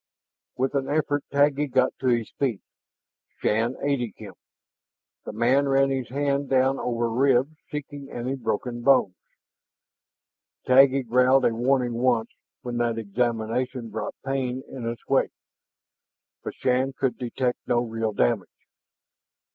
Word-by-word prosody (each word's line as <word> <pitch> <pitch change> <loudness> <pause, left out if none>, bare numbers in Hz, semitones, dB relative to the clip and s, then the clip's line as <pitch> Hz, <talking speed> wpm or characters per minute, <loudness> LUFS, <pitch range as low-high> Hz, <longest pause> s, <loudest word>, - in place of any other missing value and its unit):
With 130 +2 0
an 135 -1 -1
effort, 145 -1 0
Taggi 145 +1 +2
got 130 -1 +2
to 130 - -2
his 120 -3 +1
feet, 125 -8 0 0.8
Shann 115 +4 0
aiding 130 -7 -1
him. - - -10 0.9
The - - -5
man 130 +5 +2
ran 135 0 +3
his 130 -2 -2
hand 140 +1 -1
down 135 0 +2
over 120 -1 -1
ribs, 130 +4 +2
seeking 145 -1 -7
any 120 +2 -3
broken 120 0 -3
bones. 130 -7 +4 1.5
Taggi 135 +1 +5
growled 125 +3 +4
a 115 - +3
warning 125 +1 +1
once 120 -1 +1 0.3
when 120 -2 -4
that 120 -1 0
examination 115 +2 -2
brought - - -4
pain 130 -1 -2
in 120 -3 -5
its 115 -1 -7
wake, - - +2 1.1
but - - -6
Shann 130 +1 0
could 135 -1 -2
detect 125 0 -2
no 120 -1 +2
real 115 -2 -2
damage. - - 0
125 Hz, 130 wpm, -25 LUFS, 120-135 Hz, 1.5 s, Taggi